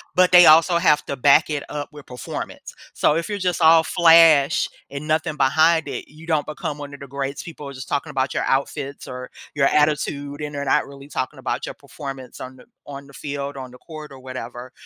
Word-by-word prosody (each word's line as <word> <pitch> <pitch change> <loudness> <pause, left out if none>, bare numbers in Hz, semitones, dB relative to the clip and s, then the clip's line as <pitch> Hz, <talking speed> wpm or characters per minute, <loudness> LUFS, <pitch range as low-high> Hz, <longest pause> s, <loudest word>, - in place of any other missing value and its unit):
but 180 0 +4
they 175 -1 +9
also 165 +2 +6
have 155 -4 +3
to 140 - -3
back 145 +4 +4
it 145 -2 -3
up 145 -1 -5
with 150 -2 -13
performance. 125 0 -8 0.2
So 150 - +2
if 165 - -2
you're 205 -1 -4
just 180 -2 -1
all 160 0 +7
flash 165 -5 +5 0.2
and 140 +2 -6
nothing 155 -1 -1
behind 160 +4 +3
it, - - -6
you 155 +3 -15
don't 155 -3 0
become 150 -1 -5
one 145 -1 -9
of 140 - -10
the 140 - -10
greats, 140 +1 -4
people 150 -4 -9
are 140 - -8
just 130 -1 -9
talking 145 +2 -2
about 130 -1 -1
your - - -1
outfits 140 +1 -2
or 125 0 -8 0.2
your 140 -2 +2
attitude, 145 -1 0
and 150 0 -5
they're 140 0 -4
not 135 - +2
really 140 0 -13
talking 130 - -4
about - - -3
your - - -6
performance 135 -3 -9
on 130 0 -9
the - - -17 0.2
on 140 0 -9
the 140 - -17
field, 140 0 -5
on 130 -1 -8
the 125 - -14
court, 155 -3 -10
or 135 - -12
whatever, 130 -1 -8
145 Hz, 220 wpm, -22 LUFS, 135-155 Hz, 0.2 s, they